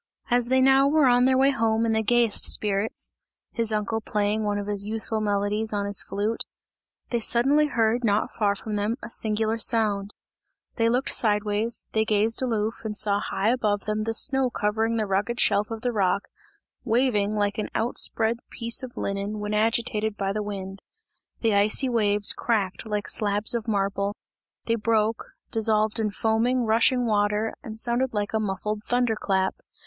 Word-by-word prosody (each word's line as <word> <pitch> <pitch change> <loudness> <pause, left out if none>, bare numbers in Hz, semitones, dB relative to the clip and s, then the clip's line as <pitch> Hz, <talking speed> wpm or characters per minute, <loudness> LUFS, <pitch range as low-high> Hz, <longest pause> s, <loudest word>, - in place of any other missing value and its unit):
As 245 0 +3
they 260 +1 +3
now 270 +1 +5
were 300 0 +3
on 245 0 +4
their 260 0 +3
way 270 +1 +4
home 225 -3 +1
in 225 - +1
the 220 0 +2
gayest 235 0 +3
spirits 205 +1 -1 0.4
his 230 -2 0
uncle 215 +1 -1
playing 210 0 -1
one 205 -1 -1
of 205 - -4
his 205 -1 -3
youthful 220 +1 -3
melodies 210 +1 0
on 200 -1 -1
his 200 0 0
flute 210 +3 -2 0.7
they 240 - +1
suddenly 270 +7 +3
heard 230 -2 +1
not 210 -1 +1
far 205 -2 0
from 210 +1 -4
them 210 +3 -1
a 230 - -7
singular 220 +1 0
sound; 210 -4 0 0.6
they 230 -1 +1
looked 250 +3 0
sideways, 210 +1 +1
they 220 - +2
gazed 220 +2 +1
aloof 225 -3 -2
and 215 -2 -3
saw 200 -1 +2
high 200 +1 -1
above 215 -4 0
them 215 +1 -2
the 225 0 -1
snow 265 +1 +3
covering 220 +1 -1
of 230 - -1
the - - 0
rugged 205 +5 -1
shelf 205 +1 +2
of 225 -1 -6
the 245 - -1
rock, 200 -3 0 0.5
waving 225 -4 +1
like 205 0 -1
an 215 - -3
outspread 225 0 0
piece 230 +2 0
of 255 -2 -9
linen 200 +2 -3
when 210 0 -4
agitated 220 -1 0
by 195 0 -1
the 210 - -2
wind. 195 -2 -6 0.6
The 225 -2 +2
icy 210 +6 +2
waves 210 -3 +2
cracked 210 -3 -2
like 210 -1 -3
slabs 205 +1 +2
of 235 -1 -3
marble, 200 -1 -1 0.5
they 230 - +1
broke, 225 0 0 0.3
dissolved 220 0 +2
in 215 -1 0
foaming, 225 +4 0
rushing 235 +3 +3
water 210 0 0
and 220 -1 -9
sounded 240 +1 0
like 205 0 -2
a 220 - +1
muffled 210 +1 -3
thunder 245 -1 +1
clap. 190 -2 -1
220 Hz, 175 wpm, -25 LUFS, 205-230 Hz, 0.7 s, now